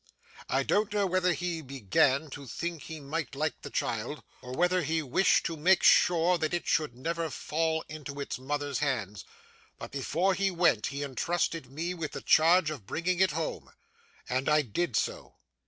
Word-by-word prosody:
I - - +2
don't 210 0 +1
know 205 -1 +1
whether 185 -1 +2
he 175 -2 -3
began 135 +2 +1
to 140 0 -8
think 170 +6 -4
he 160 -1 -8
might 150 +1 -4
like 155 +3 -2
the 145 - -7
child, 120 +3 -3 0.2
or 125 - -9
whether 180 +5 +2
he 160 +1 -1
wished 150 +8 +3
to 165 - -2
make 175 +4 +3
sure 175 0 +5
that 155 +2 0
it 175 - -3
should 155 -6 +1
never 165 +5 -2
fall 160 +1 -1
into 145 -2 -7
its 140 - -4
mother's 145 +1 -2
hands; 105 - -2 0.5
but, - - -8
before 165 +8 0
he 195 +1 +1
went, 170 - +2
he 140 +1 -4
intrusted 160 +1 -2
me 165 +5 -3
with 165 -4 -5
the - - -5
charge 165 0 +4
of 125 -11 -8
bringing 180 +6 -1
it 190 -4 +3
home. 160 +1 -4 0.6
And 130 +3 0
I 150 0 +4
did 125 +3 -2
so. - - -2
155 Hz, 180 wpm, -29 LUFS, 140-175 Hz, 0.6 s, sure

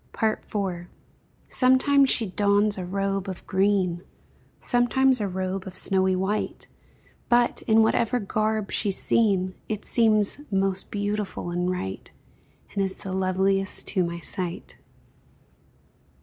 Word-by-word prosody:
IV. 195 -5 -2 0.6
Sometimes 265 +2 +4
she 230 - +3
dons 205 +1 +2
a 180 - -4
robe 195 +1 -2
of 185 - -8
green, 190 -3 +1 0.6
Sometimes 250 +1 +2
a 205 - 0
robe 190 +1 -3
of 185 0 -8
snowy 190 -1 +2
white, 190 +3 -2 0.6
But, 240 0 +2
in 220 -1 +5
whatever 230 +2 +1
garb 215 0 -1
she's 200 -4 +1
seen, 195 -5 +1 0.2
It 215 -1 -4
seems 215 +2 +2
most 195 -1 0
beautiful 205 -3 -3
and 175 +1 -1
right, 95 - -5 0.6
And 200 - 0
is 190 -1 -2
the 190 - -7
loveliest 190 +1 0
to 185 -3 +1
my 170 0 -4
sight. 180 0 -5
195 Hz, 120 wpm, -25 LUFS, 185-215 Hz, 0.6 s, in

